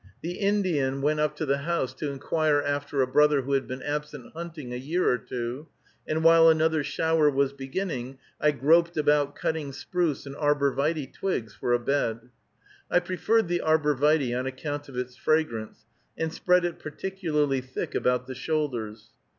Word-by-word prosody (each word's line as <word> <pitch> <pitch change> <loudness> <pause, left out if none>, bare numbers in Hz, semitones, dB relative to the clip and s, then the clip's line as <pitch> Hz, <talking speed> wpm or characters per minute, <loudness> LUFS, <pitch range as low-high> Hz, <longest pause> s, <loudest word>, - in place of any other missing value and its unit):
The 175 +2 -4
Indian 175 -10 +1
went 150 +1 +2
up 150 0 +1
to 155 - -3
the 140 0 +1
house 160 -3 -1
to 150 - -4
inquire 150 +2 +1
after 145 -1 0
a - - -1
brother 150 +1 +4
who 140 - -4
had 135 -1 +1
been 130 +1 -6
absent 150 -3 -5
hunting 160 -6 -7
a - - -3
year 160 +8 -1
or 125 - +3
two, 125 +6 -5 0.4
and 160 +1 -1
while 165 0 +7
another 160 -1 +3
shower 160 +1 +2
was 140 -1 +1
beginning, 135 -2 -4 0.2
I 150 - +4
groped 165 +4 +3
about 145 -1 +2
cutting 155 -3 -2
spruce 165 +1 -2
and 140 0 -8
arbor 145 -2 +1
vitæ 145 -1 -1
twigs 120 - -3
for 120 - -3
a - - +5
bed. 120 -2 -1 0.6
I - - +4
preferred 185 +4 +1
the 175 0 0
arbor 155 -2 +2
vitæ 140 -3 +2
on 130 - -3
account 145 +2 -5
of 130 - -9
its 125 0 -4
fragrance, 115 -8 -1 0.3
and 160 0 -2
spread 180 -1 +3
it 175 -2 -3
particularly 155 -5 -1
thick 130 0 -5
about 125 0 +1
the 130 - -6
shoulders. 120 -7 -3
145 Hz, 175 wpm, -27 LUFS, 130-160 Hz, 0.6 s, while